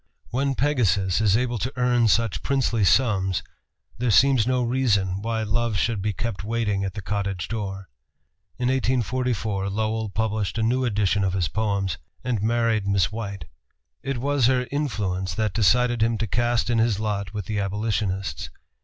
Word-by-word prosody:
When 135 +3 0
Pegasus 105 - +1
is 105 -1 +4
able 120 -1 -1
to 125 +7 -2
earn 125 -2 +3
such 115 -1 +1
princely 130 -5 +1
sums, 95 -4 +2 0.6
there 125 0 0
seems 125 0 +4
no 130 -1 +1
reason 105 -7 +1
why 110 0 -1
Love 110 0 0
should 110 -1 0
be 105 +2 0
kept 105 +1 -4
waiting 105 -3 -1
at 95 -1 -4
the 105 - -6
cottage 100 -3 -2
door. 100 -4 -5 0.7
In 125 +1 0
1844 120 -5 0
Lowell 110 +1 -1
published 105 -1 -1
a 110 - +1
new 125 +3 +1
edition 105 -3 +1
of 95 -1 0
his 90 -3 +1
poems, 100 -5 -1 0.2
and 120 -5 -1
married 115 -2 +1
Miss 100 -2 +2
White. 100 -6 -5 0.6
It 135 -1 -3
was 140 0 +2
her 125 -1 +2
influence 100 - -2
that 105 -1 0
decided 120 +2 +3
him 115 0 +2
to 110 - -1
cast 120 +2 0
in 115 - +2
his 110 -3 +2
lot 100 -3 -3
with 105 -3 -3
the 105 +2 -2
abolitionists. 100 -1 -2
110 Hz, 165 wpm, -24 LUFS, 100-120 Hz, 0.7 s, is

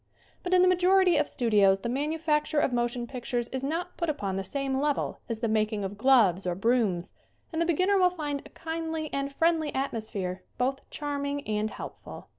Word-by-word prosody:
But 360 - -4
in 365 - +6
the - - +5
majority 365 -1 +4
of 295 - +1
studios 205 -5 +3
the - - -3
manufac 300 +4 0
ture 310 - 0
of 265 - +1
motion 240 0 -1
pictures 240 -1 -3
is 260 0 -4
not 325 +5 -3
put 340 -2 -1
upon 200 -11 -2
the 195 - -2
same 270 +4 -2
level 290 0 -1
as 230 -1 -3
the 230 - +1
making 215 -1 0
of 195 +1 -4
gloves 205 -6 +4
or 175 - 0
brooms, 200 -4 +1 0.4
and 320 - 0
the 335 - +1
beginner 370 +4 +3
will 365 -1 +5
find 295 -5 -4
a - - -13
kindly 320 -1 -4
and 275 0 -2
friendly 320 +1 +1
atmosphere 215 -8 -3 0.2
both 265 +2 -2
charming 285 -1 -3
and 215 0 0
helpful. - - -9
275 Hz, 195 wpm, -28 LUFS, 220-315 Hz, 0.4 s, in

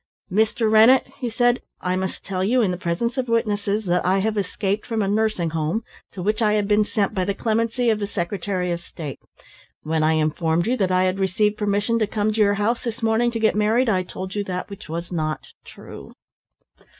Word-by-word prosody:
"Mr. 220 +3 +2
Rennett," 225 +4 +6
he 245 -3 -2
said, 245 +2 +2 0.2
"I 180 0 -1
must 190 0 -4
tell 185 -2 -2
you 240 +5 +3
in 190 - +1
the - - -2
presence 235 +9 -2
of 250 -2 -2
witnesses, 210 -2 0
that 180 0 +1
I 185 +2 +2
have 215 +3 0
escaped 200 +1 -1
from 225 -3 0
a - - -1
nursing 205 -5 0
home 165 +7 -1 0.3
to 185 - -6
which 210 +3 0
I 210 -1 +3
had 210 -1 +1
been 210 0 +4
sent 210 -1 -1
by 190 -2 0
the 200 +1 -1
clemency 230 +2 +1
of 215 - 0
the 205 - -2
Secretary 180 -1 -2
of 170 0 -2
State. 155 -5 -8 0.6
When 160 0 0
I 155 +1 +3
informed 160 +2 +1
you 245 +3 +1
that 190 -4 +1
I 185 0 +3
had 185 +1 0
received 210 +2 +1
permission 210 +2 0
to 215 - +1
come 215 +1 0
to 220 - +1
your 205 -1 +4
house 215 +4 0
this 230 -1 -5
morning 225 +2 +2
to 235 -1 -3
get 220 -1 +3
married, 220 +4 +2
I 185 -3 +2
told 185 +1 -7
you 205 - -1
that 180 +1 -4
which 200 - -10
was 170 +2 -5
not 155 -3 -3 0.2
true." - - -11
205 Hz, 220 wpm, -22 LUFS, 185-220 Hz, 0.6 s, Rennett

